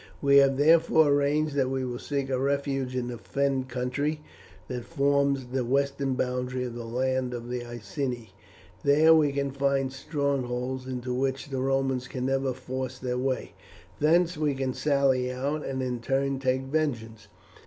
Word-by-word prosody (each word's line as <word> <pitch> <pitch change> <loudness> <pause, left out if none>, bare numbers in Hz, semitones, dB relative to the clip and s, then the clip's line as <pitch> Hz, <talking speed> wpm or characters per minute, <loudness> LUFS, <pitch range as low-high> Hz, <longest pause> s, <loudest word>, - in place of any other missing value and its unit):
We 140 -1 +5
have 135 -1 +5
therefore 160 +1 +5
arranged 145 +1 +2
that 135 -2 +1
we 130 -1 -1
will 120 -1 -4
seek 140 -2 -3
a 130 - +1
refuge 135 -1 -1
in 125 -1 -1
the 120 -2 -6
Fen 135 -2 -1
country 130 +4 -2 0.5
that 125 -1 -4
forms 140 -2 +1
the 130 -1 +1
western 140 +1 0
boundary 125 0 -2
of 125 -2 -4
the 120 0 -6
land 130 +1 -1
of 120 0 -7
the 125 -1 -3
Iceni; 120 -1 -5 0.5
there 155 +3 +6
we 155 -3 +4
can 140 0 -1
find 135 -1 0
strongholds 130 -3 -2
into 125 -1 -3
which 135 +2 -1
the 130 -1 -1
Romans 135 -1 0
can 125 0 -4
never 135 0 +1
force 130 0 -5
their 125 -1 -2
way; 130 0 -2 0.5
thence 170 +3 +3
we 150 -3 +1
can 130 -1 -2
sally 135 -3 +2
out, 140 +4 -2
and 130 -1 -3
in 125 -1 -2
turn 135 +2 0
take 130 0 0
vengeance. 120 -7 -2
135 Hz, 165 wpm, -27 LUFS, 125-140 Hz, 0.5 s, there